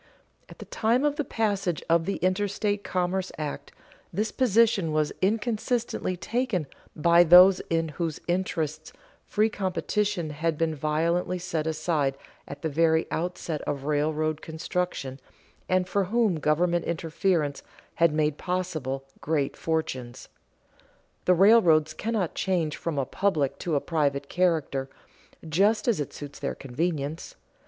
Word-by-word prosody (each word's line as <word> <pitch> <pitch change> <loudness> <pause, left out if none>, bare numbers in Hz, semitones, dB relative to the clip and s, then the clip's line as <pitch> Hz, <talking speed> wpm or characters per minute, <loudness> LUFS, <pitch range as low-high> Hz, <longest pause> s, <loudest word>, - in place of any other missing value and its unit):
At - - -13
the - - -9
time 235 +5 +1
of 295 0 +1
the 295 - 0
passage 200 - -1
of 165 0 +3
the 200 - 0
Interstate 205 +2 0
Commerce 185 +1 -1
Act 150 -2 -5 0.4
this 210 +5 -1
position 225 -8 +3
was 155 -1 0
inconsistently 220 -1 -1
taken 220 - -1 0.3
by 170 +2 +5
those 180 +3 +8
in 165 -1 0
whose 160 0 -3
interests 160 -4 -2 0.3
free 215 +1 +2
competition 200 -3 -1
had 155 +1 -1
been 165 0 0
violently 165 +5 0
set 170 -3 -3
aside 155 -4 0 0.3
at 140 - -9
the - - +1
very 160 +1 +2
outset 165 -2 -3
of 140 -2 -2
railroad 155 +1 0
construction, 160 -4 -3 0.5
and 185 0 +2
for 200 +1 +1
whom 210 -4 +1
government 170 +3 +1
interference 165 -2 -1 0.3
had 170 -1 +3
made 150 -1 0
possible 160 -8 -3 0.2
great 145 -3 -1
fortunes. 130 -6 -3 1.0
The 180 - +5
railroads 175 -6 +5
cannot 215 -6 -2
change 170 -5 0
from 165 -3 -4
a 135 - +1
public 150 -6 0
to 165 -3 -1
a - - +3
private 140 -3 -1
character 160 -7 0 0.6
just 200 +10 +2
as 230 -8 +2
it 145 - -3
suits 145 -1 -9
their 140 - -3
convenience. 145 +2 -3
170 Hz, 135 wpm, -26 LUFS, 155-190 Hz, 1.0 s, those